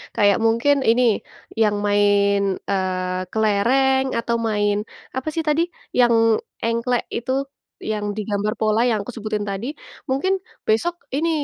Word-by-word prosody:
kayak 205 -1 +4
mungkin 235 +6 +3
ini, 245 +2 +4 0.6
yang 210 -1 +3
main, 205 0 +3 0.3
eee, 185 -1 -1
kelereng 255 +6 +2
atau 235 0 -1
main 205 -2 +1 0.4
apa 260 +3 -4
sih 325 0 -1
tadi 300 +2 +3 0.4
yang 240 -1 +5 0.5
engklek 235 +1 0
itu, 245 +2 -3 0.6
yang 210 -1 -2
digambar 210 0 -1
pola 215 +1 +2
yang 220 -3 +1
aku 250 - -7
sebutin 215 -2 -3
tadi, 200 +5 -4 0.4
mungkin 275 +9 +1 0.3
besok 340 +11 +1 0.2
ini 330 +3 +1
220 Hz, 130 wpm, -22 LUFS, 205-250 Hz, 0.6 s, yang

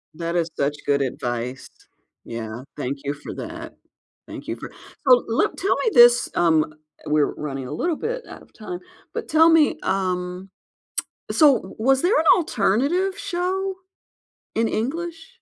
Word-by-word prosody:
That 170 +1 -3
is 170 -1 +1
such 140 +1 +1
good 140 -1 +2
advice. 125 -1 -3 0.6
Yeah. 115 +1 -6
Thank 140 0 -3
you 140 +1 -1
for 145 - -9
that. - - -7 0.5
Thank - - -9
you - - -2
for - - -8 0.4
So, 250 -1 +7
look 225 - +1
tell 390 - +1
me 450 - +2
this, 240 0 +7
um 160 -3 +3 0.3
we're 150 -1 +2
running 135 -3 -5
a - - -7
little 330 - 0
bit 485 +6 -3
out - - -10
of - - -19
time 360 -1 -7 0.3
but - - -4
tell 320 +1 +6
me, 325 -2 +4
um, 185 0 -2 0.8
so, 290 -6 +6
w 190 - -11
was 265 +3 +3
there 390 +8 +3
an 320 - 0
alternative 350 - +1
show 380 0 -2 0.8
in 225 0 +2
English? 330 - -3
220 Hz, 155 wpm, -23 LUFS, -, 0.8 s, So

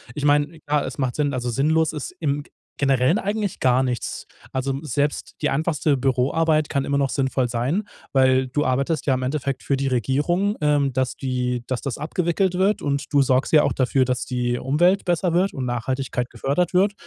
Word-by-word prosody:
Ich 145 - -4
meine, 145 +2 +2
klar, 145 0 0
es 130 - -6
macht 130 -3 -1
Sinn 145 -2 0
also 125 -1 -2
sinnlos 160 +5 +1
ist 150 - -5
im 145 -2 -1
g - - -25 0.3
Generellen 135 - +3
eigentlich 205 -1 -2
gar 130 0 +3
nichts. 125 -2 -3 0.3
Also 130 +1 -1
m 135 +3 -3
selbst 145 +2 -1
die - - +1
einfachste 150 0 +1
Büroarbeit 145 +5 +1
kann 140 -2 -1
immer 140 0 0
noch 135 -1 +1
sinnvoll 130 -2 0
sein, 130 - -1 0.3
weil 130 -1 +4
du 145 +3 0
arbeitest 140 +4 0
ja 135 - +4
im 130 - -3
Endeffekt 135 0 -2
für 140 - +1
die 135 0 -1
Regierung, 150 - +1
ähm, 145 -3 +2
dass 130 -1 -1
die 125 -2 -2
dass 130 -2 -3
das 140 -4 -4
abgewickelt 170 +4 0
wird 190 +3 +1
und 140 +1 -1
du 145 -1 +4
sorgst 130 0 +1
ja 150 -2 +6
auch - - +1
dafür, 130 0 +2
dass 125 0 -1
die 120 -1 -1
Umwelt 175 +10 +2
besser 175 0 +1
wird 185 +3 +2
und 130 -2 -3
Nachhaltigkeit 125 +1 -2
gefördert 145 +9 -1
wird. 200 +3 +4
140 Hz, 200 wpm, -23 LUFS, 130-155 Hz, 0.3 s, ja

